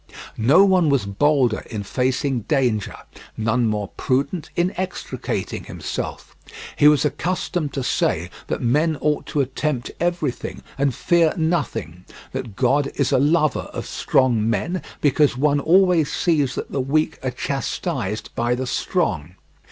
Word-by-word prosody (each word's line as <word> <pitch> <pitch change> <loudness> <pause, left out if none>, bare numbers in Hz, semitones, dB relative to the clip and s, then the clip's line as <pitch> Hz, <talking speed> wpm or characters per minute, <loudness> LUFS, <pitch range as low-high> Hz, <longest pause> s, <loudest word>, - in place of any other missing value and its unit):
No 140 - +5
one 185 -5 +3
was 140 -7 +2
bolder 125 +3 +2
in 105 -3 -4
facing 130 +3 0
danger, 125 -8 +1 0.4
none 115 +2 +1
more 105 -2 -2
prudent 140 +6 -1
in 175 +2 +1
extricating 185 0 -4
himself. - - -6 0.4
He 145 - +5
was 150 0 +5
accustomed 165 +1 -2
to 135 - -2
say - - 0 0.2
that - - -3
men 150 +6 +2
ought 150 +1 0
to 145 - 0
attempt 135 -1 -2
everything 170 -6 -2
and 135 -3 0
fear 170 -2 +2
nothing; 145 - -2 0.3
that 110 -5 -5
God 135 +4 +2
is 140 - +1
a - - +4
lover 155 +1 +2
of - - -4
strong 115 -4 +1
men, 175 +9 -1 0.2
because 145 -2 +3
one 145 +1 +2
always 175 0 +4
sees 150 -7 +1
that - - -5
the 135 - -1
weak 155 +4 0
are 130 - 0
chastised 125 - -3
by 120 +1 0
the 130 +1 -3
strong. 80 -8 -1
140 Hz, 145 wpm, -22 LUFS, 120-155 Hz, 0.4 s, No